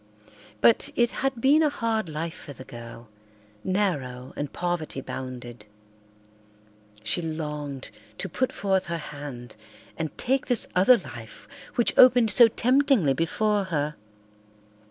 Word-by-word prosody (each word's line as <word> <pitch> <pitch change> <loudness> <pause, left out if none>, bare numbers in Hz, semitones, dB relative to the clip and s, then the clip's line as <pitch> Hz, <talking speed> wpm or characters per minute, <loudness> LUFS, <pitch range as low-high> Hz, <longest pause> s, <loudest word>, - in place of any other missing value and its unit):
But 230 - +4
it 240 -1 +2
had 270 -2 -2
been 280 +6 +4
a 305 - +3
hard 225 - -2
life 160 +2 -4
for 145 - -11
the 130 - -11
girl, 115 -1 -11 0.6
narrow 145 -11 -2
and 145 -1 -4
poverty 175 -5 -3
bounded. 125 -4 -7 1.4
She 110 +10 -1
longed 150 -4 -5 0.3
to - - -4
put 255 +9 -1
forth 190 -2 0
her 170 0 -2
hand 140 -6 -8 0.4
and 160 -2 -4
take 265 +2 0
this 245 -3 +4
other 195 +7 +6
life - - -11 0.3
which 240 - +2
opened 245 -3 +7
so 235 +3 +8
temptingly 250 - +2
before 205 +7 0
her. 150 -4 -2
170 Hz, 130 wpm, -25 LUFS, 140-230 Hz, 1.4 s, so